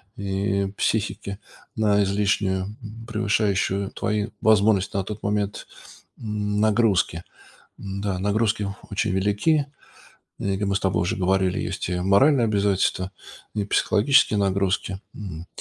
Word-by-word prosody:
и 100 0 -1
психики 100 -2 -1 0.4
на 105 -2 +3
излишнюю, 100 -1 +1
м, 105 +3 -8 0.3
превышающую 100 -3 0
твои 105 +1 -2
возможности 105 -3 +3
на 100 - +1
тот 105 +2 -7
момент, 105 0 -2 0.5
нагрузки. 105 -4 +1 0.6
Н-да, 100 -1 -3
нагрузки 105 +1 +1 0.2
очень 100 +1 0
велики. 105 +11 +2 0.7
И, 100 -1 -1
как 100 +1 -1
мы 100 - 0
с - - +1
тобой 95 -3 0
уже 90 - -1
говорили, 95 0 +1
есть 90 +1 -3
и 90 -1 -1
моральные 115 +8 +4
обязательства, 100 -3 +1 0.4
и 105 - -1
психологические 110 +3 +3
нагрузки. 95 0 0
Мгм. 90 -5 -8
100 Hz, 120 wpm, -24 LUFS, 95-105 Hz, 0.7 s, моральные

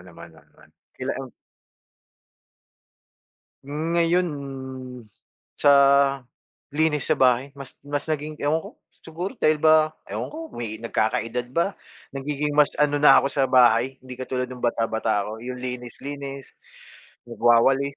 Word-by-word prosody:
naman, 85 -2 -13
oo 80 - -18
naman. - - -23 0.2
Kila, - - -3
um - - -8 2.3
Ngayon, 165 +5 +1 1.3
sa 145 - +4 1.0
linis 150 -1 +1
sa - - -1
bahay 130 +1 +3
mas 140 -2 -11
mas 145 +1 -4
naging 155 0 -3
ewan 145 +2 +1
ko, - - -9 0.3
siguro 170 +4 -5
dahil 155 -5 +2
ba 155 -1 +5 0.2
ewan - - -5
ko, 320 +1 -7
may 110 -2 -5
nagkaka-edad 115 +1 -1
ba? 170 +7 0 0.4
Nagiging 145 +1 -2
mas 150 -1 +4
ano 145 0 +3
na 145 -2 +7
ako 140 - -1
sa 140 -1 0
bahay, 125 0 +3
hindi 130 -1 -10
katulad 125 -1 -3
nung 125 -1 -8
bata-bata 110 -3 0
ako, 110 +2 -8
yung 125 0 -6
linis-linis, 135 +3 -7 0.7
magwawalis. 120 +4 +3
135 Hz, 125 wpm, -24 LUFS, 120-150 Hz, 2.3 s, na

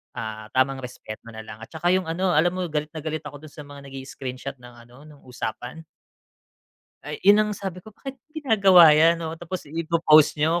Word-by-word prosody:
ah, 110 -2 -6
tamang 130 +1 +2
respect 125 -4 -9
mo - - -9
na 110 - -8
lang 110 0 -11
at 110 - -10
tsaka 170 +2 -1
yung 185 -2 +1
ano, 180 +3 0
alam 175 +3 +2
mo 185 - -2
galit 150 0 -2
na 155 - -6
galit 155 0 -3
ako 145 0 -11
dun 155 - -12
sa 150 - -15
mga 140 -1 -12
nag-i-screenshot 135 0 -7
ng 125 -1 -15
ano, 125 +4 -17
nung 150 -2 -17
usapan. 125 +5 -6 1.2
Ay, - - -6
yun 205 +1 +7
ang 210 0 0
sabi 190 -2 -6
ko, 195 - -15
bakit 270 -2 -9
ginagawa 200 - +6
'yan, 165 +3 +5
oo, 160 - -4
tapos 175 +2 -6
ipo-post 160 -1 +3
niyo 160 +3 +1
155 Hz, 205 wpm, -24 LUFS, 130-175 Hz, 1.2 s, yun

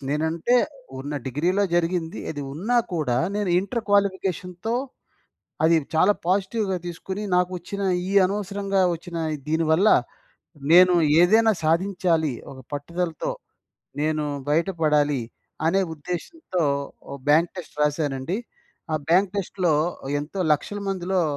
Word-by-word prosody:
నేనంటే, 160 - 0 0.4
ఉన్న 145 +2 -5
డిగ్రీలో 175 +10 +1
జరిగింది. 170 -1 0
అది 145 -2 -5
ఉన్నా 210 - 0 0.2
కూడా 145 -7 0 0.2
నేను 205 -3 0
ఇంటర్ 225 +5 -2
క్వాలిఫికేషన్‌తో 190 +1 0 0.9
అది 165 +1 +5 0.2
చాలా 190 +6 +5
పాజిటివ్‌గా 195 +1 0
తీసుకుని, 190 +4 -5
నాకొచ్చిన 180 +2 -1 0.3
ఈ - - -2
అనవసరంగా 200 0 -1
ఒచ్చిన 170 0 -8 0.3
దీని 160 +1 +1
వల్ల 180 +7 +4 0.9
నేను 180 +1 +8 0.3
ఏదైనా 220 +5 +5
సాధించాలి 165 -2 +1 0.2
ఒక 135 - -11
పట్టుదలతో, 165 +3 -3 0.7
నేను 155 0 0 0.2
బయటపడాలి 150 -4 +2 0.5
అనే 190 +4 +3
ఉద్దేశ్యంతో 180 - -4 0.5
ఓ - - -6 0.2
బ్యాంక్ 160 +4 +4
టెస్ట్ 170 -4 -9
రాశానండి. 145 +1 0 0.6
ఆ - - +2
బ్యాంక్ 185 +3 +3
టెస్ట్‌లో 185 -4 0 0.5
ఎంతో 165 +6 -5
లక్షల 205 +7 -2
మందిలో, 185 -1 0
175 Hz, 110 wpm, -24 LUFS, 155-195 Hz, 0.9 s, నేను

